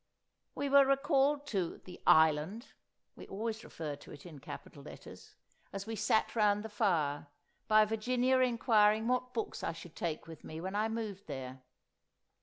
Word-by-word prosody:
We 285 - -2
were 280 0 +7
recalled 280 +1 +2
to 185 -5 -2
The 180 - -11
Island 160 - +4 0.5
(we - - -11
always 220 +2 -4
refer 150 -3 -6
to - - -14
it 145 - -12
in 160 -5 -10
capital - - -10
letters) - - -12 0.4
as 195 +1 -5
we 225 - -4
sat 220 +2 +1
round 210 -2 +3
the 220 - -6
fire, 165 -9 0 0.4
by 215 0 +6
Virginia 250 +4 +1
inquiring 225 -3 +3
what 250 0 -1
books 225 - -3
I 165 - -1
should 165 0 -12
take 165 -3 -3
with 165 -1 -11
me 160 - -7
when 190 +3 -5
I 215 +2 +1
moved 215 -3 -5
there. 130 -2 -7
210 Hz, 165 wpm, -33 LUFS, 165-235 Hz, 0.5 s, were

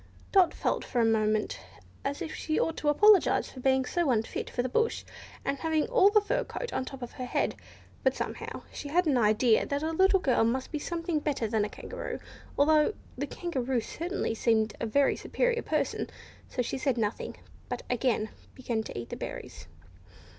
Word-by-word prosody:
Dot 375 -3 +6
felt - - -1
for 245 - -2
a 230 - +4
moment 215 -1 +1 0.4
as 280 +5 -2
if 320 - -5
she 310 - -1
ought 325 - 0
to 295 - +1
apologise 415 +6 +5
for 260 - -10
being 265 0 +2
so 345 +1 0
unfit 225 -3 -1
for 245 - -1
the - - 0
bush, 455 - 0 0.4
and 280 0 0
for - - -15
having 320 -2 +1
all - - +6
the 425 +1 +5
fur - - 0 0.3
on - - 0
the - - -7
top 270 -2 -8
of 240 - -6
her 255 - -6
head. 245 - 0 0.5
But, 265 0 +3
somehow, - - -5
she - - -6
had 350 +5 +2
an 295 -4 +3
idea 220 +1 +4
that 285 +1 -1
a 320 - 0
little 380 +3 +4
girl 260 -9 +3
must 255 +3 0
be 305 - -2
something 335 0 -2
better 285 -6 -1
than 215 -1 +1
a - - -5
kangaroo, - - -6 0.4
although 305 +6 +4 0.2
the - - -3
Kangaroo 265 -8 -1
certainly 340 - -3
seemed 220 -1 +2
a 230 - -1
very 280 +5 +3
superior - - 0
person; - - -1 0.4
so 250 - -1
she 265 - -3
said 260 -2 +1
nothing, 215 -1 -2 0.3
but 245 - -4
again 245 -3 +1 0.3
began 240 -4 -2
to - - -7
eat 120 - -5
the - - -4
berries. 85 -2 -7
270 Hz, 195 wpm, -29 LUFS, 230-330 Hz, 0.5 s, Dot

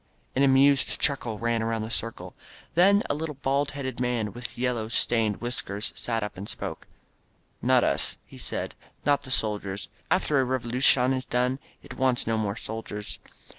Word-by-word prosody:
An 130 - +2
amused 140 0 +5
chuckle 120 -6 +1
ran 115 +1 0
around 115 -1 -1
the 110 - -5
circle. 115 0 -3 0.4
Then 200 +5 +5
a - - 0
little, 150 0 -4
bald 140 +1 0
headed 130 -2 -4
man, 120 -5 -1
with 120 +1 -8
yellow, 120 -3 0
stained 115 -2 +2
whiskers, 115 -3 -3
sat 115 -2 -1
up 105 - -5
and 100 - -5
spoke. - - -5 0.7
"Not - - +4
us," - - +1
he - - -13
said, - - -2 0.3
"not 145 0 +3
the 135 - -9
soldiers. 105 -5 0 0.2
After 155 -6 +3
a 130 0 0
Revo - - -18
lucion 125 0 +4
is 130 0 -1
done 125 +2 0 0.2
it - - -10
wants 130 -2 +2
no 115 - +1
more 105 -2 -1
soldiers. 105 -2 -6
125 Hz, 170 wpm, -27 LUFS, 110-135 Hz, 0.7 s, amused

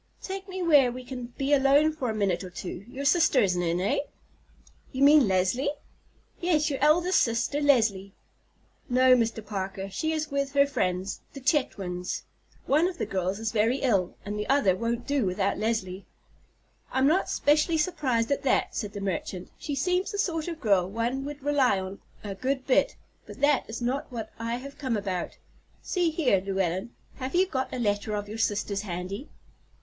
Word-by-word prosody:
"Take 385 0 -6
me 375 -1 -4
where 290 -7 +5
we 255 +1 -7
can 250 -1 -6
be 275 +1 +1
alone 285 +3 +4
for 265 -6 -3
a 220 - -2
minute 195 -4 0
or 185 - -7
two. 180 +1 -7
Your 275 +3 -6
sister 300 -2 +4
isn't 180 -5 +2
in—eh?" 175 +3 0
"Do 285 -1 -14
you 270 - +2
mean 290 -3 +7
Leslie?" 190 +9 +1 0.7
"Yes, 315 -4 +1
your 270 - -2
eldest 345 +5 +4
sister, 235 +5 0
Leslie." 215 -9 +2 0.7
"No, 255 +1 +5
Mr. 225 -2 -1
Parker; 195 -1 -4
she 315 +11 -1
is 310 -1 -2
with 280 -1 -1
her 280 0 +5
friends, 185 -8 -2
the 275 - -7
Chetwynds. 195 - -1 0.4
One 310 +5 +3
of 365 -1 -5
the - - -2
girls 190 0 -2
is 220 0 -2
very 225 +4 +2
ill, 200 -9 +1
and 205 +1 -4
the 210 - -4
other 265 -10 +4
won't 235 +3 -2
do 280 -3 +1
without 195 +1 0
Leslie." 200 -4 -2 0.8
"I'm 265 0 +2
not 330 +7 +2
specially 305 +3 +2
surprised 290 -8 0
at 280 - +1
that," 270 - +1
said 205 -2 -3
the 205 - -6
merchant. 185 -1 -4
"She 290 - -4
seems 360 - 0
the 410 - -4
sort 335 -6 -1
of 335 -2 -5
girl 195 - +2
one 235 +6 -2
would 290 -1 -7
rely 275 -8 +3
on 190 +1 -6 0.2
a 205 -2 -4
good 260 +5 -2
bit; 275 +1 +2 0.3
but - - -10
that 285 -4 +3
is 230 +2 -5
not 275 +4 -2
what 225 -3 -6
I 230 +1 -2
have 275 +3 -9
come 255 -6 -1
about. 190 -3 -3 0.5
See 355 -3 +1
here, 285 - +2
Llewellyn, 190 0 -1 0.3
have 260 +4 -4
you 370 +2 +5
got 265 -8 -3
a - - -4
letter 210 -2 -1
of 205 0 -4
your 215 +2 -7
sister's 205 -2 0
handy?" 190 - -5
245 Hz, 185 wpm, -27 LUFS, 200-285 Hz, 0.8 s, mean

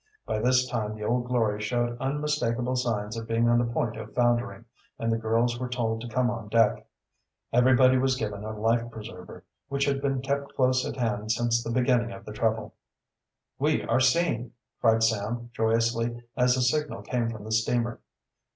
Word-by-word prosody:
By 110 - -1
this 125 +2 +3
time 110 -4 -3
the 105 - -7
Old 120 +3 0
Glory 110 -4 0
showed 120 +2 -1
unmistakable 135 -3 -1
signs 110 -4 -1
of 115 0 -5
being 115 +1 +2
on 120 0 +4
the 120 -1 0
point 115 -1 -1
of 110 -1 -9
foundering, 120 -1 +1 0.3
and 115 0 -1
the 115 - +1
girls 115 +2 +1
were 125 -1 -3
told 115 -2 -1
to 120 - -6
come 125 +1 +1
on 115 -3 -6
deck. 115 -1 +2 0.7
Everybody 130 +1 +5
was 130 0 +2
given 105 -4 -4
a 110 0 -5
life 115 +2 +1
preserver, 105 -6 -10 0.2
which 140 0 0
had 140 -1 0
been 135 -1 0
kept 140 +1 -3
close 130 -1 +2
at - - -5
hand 110 -3 -1
since 120 0 +1
the - - -5
beginning 120 -1 +2
of - - -11
the 105 - -7
trouble. 110 +1 -1 0.9
"We - - +1
are - - +1
seen!" 130 -3 +1 0.3
cried 115 -1 +3
Sam 110 +2 -1
joyously, 115 +1 0
as 125 0 +3
a 130 - +2
signal 150 +4 0
came 120 -2 -1
from 110 -3 -7
the 110 - -7
steamer. 115 +1 0
120 Hz, 185 wpm, -27 LUFS, 110-125 Hz, 0.9 s, Everybody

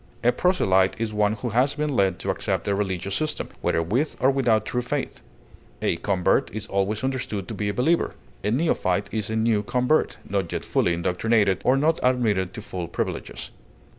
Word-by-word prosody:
A 120 - +5
proselyte 95 - +2
is 115 -1 -2
one 105 0 +2
who 115 +3 -4
has 125 +5 +2
been 150 -2 -1
led 95 -4 +2
to - - -1
accept - - -2
a 100 - +2
religious 100 -1 -2
system, 155 +8 -2
whether 80 - +1
with 120 - -1
or 130 +2 +4
without 115 -6 +2
true 125 - -1
faith; 125 - -3 0.6
a - - 0
convert 95 -1 +1
is 110 -1 -4
always 100 +2 -1
understood 120 -8 -2
to - - -5
be 105 -1 -2
a - - -1
believer. 165 +7 +1 0.3
A - - +1
neophyte 105 - +1
is 110 -2 -2
a 110 - -2
new 110 -1 +2
convert, 125 +8 +1
not 95 -3 -1
yet - - -3
fully 85 - +1
indoctrinated, 95 +3 +1
or 130 +2 +4
not 160 +4 +2
admitted 110 -8 +1
to 110 - -7
full 90 -4 -5
privileges. 85 - -4
110 Hz, 190 wpm, -24 LUFS, 95-125 Hz, 0.6 s, A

